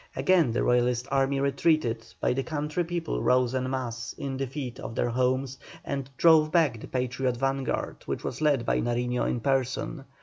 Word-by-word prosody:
Again 175 - +3
the 120 - 0
Royalist 125 0 +2
army 135 0 +2
retreated, 140 -4 +1 0.2
but - - +1
the 135 - 0
country 150 +3 -2
people 170 -1 -3
rose 125 -1 +3
en 130 0 -1
masse 120 -3 -4
in 135 -1 -4
defence 135 -1 -4
of 115 - -7
their 120 - +1
homes 130 +2 0 0.3
and 140 -1 -3
drove 160 -2 +5
back 155 -10 +3
the - - -8
Patriot 125 0 -1
vanguard, 135 +1 -1
which - - -3
was 130 - -4
led 145 -6 +2
by - - +1
Nariño 125 +1 0
in 120 - -2
person. 135 +2 -1
130 Hz, 175 wpm, -27 LUFS, 125-140 Hz, 0.3 s, drove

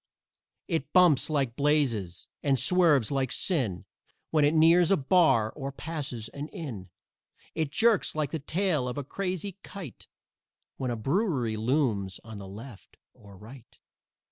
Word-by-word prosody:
It 160 -5 -2
bumps 175 -7 +5
like 135 -6 -1
blazes 130 - 0 0.2
and 140 -2 +2
swerves 150 - +4
like 135 -2 -1
sin 120 - -1 0.5
When 155 -2 +3
it 145 +2 +3
nears 165 +2 +5
a 195 - +4
bar 135 - +3
or 140 -2 -6
passes 140 -6 -6
an 145 +1 -7
inn; 115 - -8 0.6
It 160 -3 -1
jerks 220 +7 +2
like 155 -2 -1
the 160 - -3
tail 155 -3 -1
of 125 - -5
a 145 - -3
crazy 185 +4 -4
kite 185 - -10 0.7
When 130 - -3
a 120 - -1
brewery 135 - 0
looms 110 -5 0
on 110 -2 -9
the 100 - -9
left 105 +3 -12 0.2
or 100 -2 -16
right. 115 +5 -14
140 Hz, 145 wpm, -28 LUFS, 115-160 Hz, 0.7 s, bumps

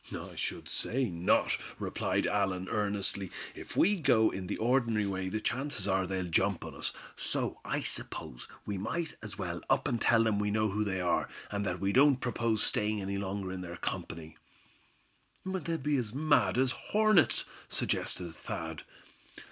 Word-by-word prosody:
"I - - -9
should - - -3
say 125 -3 -1
not," 85 +1 +2 0.2
replied - - 0
Allan 95 -2 0
earnestly. 100 -2 -1 0.2
"If - - -9
we 205 +3 +5
go 110 -9 +4
in 95 -1 -5
the 100 - -2
ordinary 115 -3 +2
way 95 -1 -2
the 110 - -1
chances 125 -3 -1
are 95 -1 +2
they'll 95 -1 -1
jump 95 +2 +2
on - - -7
us. - - -3 0.2
So - - -2
I - - -1
suppose - - -5 0.2
we 100 -2 -2
might 160 - -2
as 105 -2 -8
well 85 -4 -3
up - - +3
and 120 -5 0
tell 115 -1 +5
them 110 -2 +2
we 105 0 +1
know 110 +1 +2
who 105 +2 0
they 95 -3 -1
are, 85 -1 +1 0.2
and 100 0 -1
that 90 -1 -1
we 100 +2 +1
don't 135 0 +6
propose 115 -3 0
staying 105 0 0
any 100 0 -2
longer 95 -1 -3
in 95 -1 -4
their 85 -1 -6
company." 80 -1 -4 1.1
"They'll 180 -3 -1
be 145 0 +1
as 115 -2 -2
mad 150 -3 +3
as 130 0 +3
hornets," 215 -3 +3 0.2
suggested 85 -2 -1
Thad. - - -5
105 Hz, 170 wpm, -32 LUFS, 95-125 Hz, 1.1 s, don't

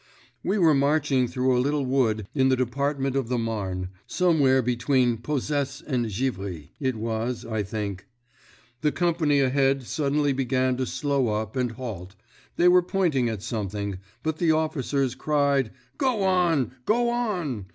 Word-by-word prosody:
"We 200 - 0
were 165 -5 +5
marching 140 -2 +2
through 125 +1 +1
a 125 - +3
little 145 +1 0
wood 120 -5 +1
in 130 -2 +3
the 130 - +4
Department 135 +2 -1
of 135 -4 0
the 125 - 0
Marne—somewhere 115 - 0
between 125 0 +1
Posesse 145 +3 -2
and 125 -5 -1
Givry, 95 - -3
it 130 -4 0
was, 115 +2 -3
I 110 -2 -2
think. 100 -2 -5 0.7
The 150 - +2
company 160 -5 +2
ahead 135 0 +2
suddenly 145 +2 0
began 130 -1 +1
to 130 -1 -1
slow 140 -4 0
up 110 +1 -2
and 125 -3 -1
halt—they 110 - -4
were 180 0 +7
pointing 170 -9 +1
at 105 -3 -5
something, 100 -3 -3 0.2
but 160 0 -1
the 170 -2 +3
officers 140 -4 0
cried: 140 -2 +1 0.3
'Go 250 -7 +1
on! 175 - +2 0.2
_Go 235 +2 +2
on! 175 - -2
130 Hz, 145 wpm, -25 LUFS, 115-150 Hz, 0.7 s, were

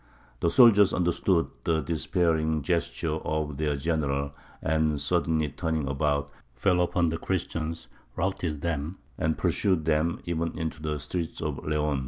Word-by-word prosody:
The 85 - +2
soldiers 105 -4 +6
understood 85 0 +1
the 80 -2 +1
despairing 80 0 0
gesture 85 -1 -1
of 75 -2 -2
their 75 -1 0
general, 70 -2 -1 0.3
and, 80 -1 +1
suddenly 80 0 +1
turning 80 -1 -2
about, 70 +1 0 0.2
fell 90 +7 +2
upon 85 -1 +2
the 80 +1 -3
Christians, 85 -3 -3 0.3
routed 85 -5 -2
them, 80 +1 -2 0.2
and 80 0 +1
pursued 90 -6 +1
them 80 +1 +1
even 85 -1 -2
into 80 -1 -4
the 75 -1 -2
streets 80 +3 -4
of 75 -3 -3
Leon. 75 -2 0
80 Hz, 140 wpm, -27 LUFS, 75-85 Hz, 0.3 s, soldiers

